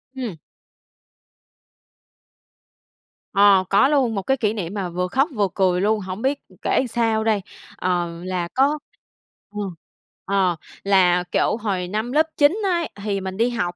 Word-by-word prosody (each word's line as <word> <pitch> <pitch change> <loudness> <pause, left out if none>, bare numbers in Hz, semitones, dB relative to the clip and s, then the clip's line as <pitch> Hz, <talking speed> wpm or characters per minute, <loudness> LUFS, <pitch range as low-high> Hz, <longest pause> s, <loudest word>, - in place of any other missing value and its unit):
Ừm. 240 -8 -4 3.0
Ờ, 200 -2 +6
có 200 +7 +5
luôn, 270 -6 +2
một 195 - -1
cái 265 +7 0
kỷ 215 -4 0
niệm 190 -4 -4
mà 195 -4 -3
vừa 180 +1 -2
khóc 270 - +1
vừa 205 -2 +2
cười 185 -2 +2
luôn, 215 +2 +2
hổng 190 +1 -6
biết, 275 +3 0
ừm, - - -20
kể - - +1
sao 225 -1 +1
đây. 220 -2 +1 0.4
Ờ, 175 -2 -1
là 180 -2 -2
có 280 +3 +2 0.7
ờ, 210 - -6 0.7
ờ 190 -3 +2 0.3
là 180 -3 +4
kiểu - - +1
hồi 195 -5 -2
năm 215 +6 -3
lớp 310 +4 +3
9 290 +6 +4
ấy, 345 -4 0
thì 200 -2 -1
mình 190 0 -5
đi 230 +2 +2
học, 180 -8 -2
205 Hz, 155 wpm, -22 LUFS, 185-240 Hz, 3.0 s, Ờ